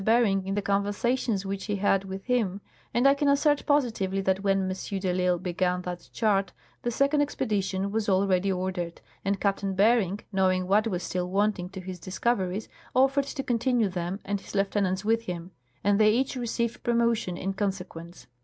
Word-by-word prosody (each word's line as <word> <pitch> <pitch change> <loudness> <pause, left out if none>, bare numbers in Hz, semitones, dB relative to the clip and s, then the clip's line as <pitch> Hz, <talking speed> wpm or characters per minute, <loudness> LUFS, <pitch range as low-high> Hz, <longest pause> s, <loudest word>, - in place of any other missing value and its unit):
Bering 205 -4 +3
in 195 - -1
the 205 - -1
conversations 205 +2 0
which 195 0 -4
he 205 - -1
had 195 -1 +2
with 190 0 -6
him; 225 -7 0 0.3
and 240 +2 +1
I 275 - +7
can 285 +1 0
assert 285 +1 +3
positively 225 -10 +1
that 190 0 +1
when 195 -1 +2
M. 190 +1 -3
de 190 -1 -1
I'Isle 180 0 +2
began 180 0 -1
that 180 -1 -6
chart 200 -4 +1 0.3
the 240 - -1
second 280 +5 +2
expedition 200 -8 -1
was 215 0 -1
already 190 0 +2
ordered, 180 -2 -3 0.2
and 200 0 0
Captain 195 -1 0
Bering, 205 -1 +3
knowing 185 -1 +2
what 205 +4 +3
was 180 -4 -2
still 180 -1 -2
wanting 195 -2 0
to 190 0 -8
his 185 -1 -7
discoveries, 190 +1 -1 0.3
offered 270 +2 +4
to 280 -1 -4
continue 240 -3 +1
them 180 +1 -3
and 200 0 -2
his - - -11
lieutenants 195 -1 0
with 225 +1 +1
him; 175 -1 -5 0.3
and 200 +1 +3
they 215 -1 +6
each 260 +4 0
received 235 -1 -2
promotion 235 -6 +1
in 195 +1 -2
conse 195 -2 -2
quence. 170 -5 -11
195 Hz, 180 wpm, -27 LUFS, 185-230 Hz, 0.3 s, I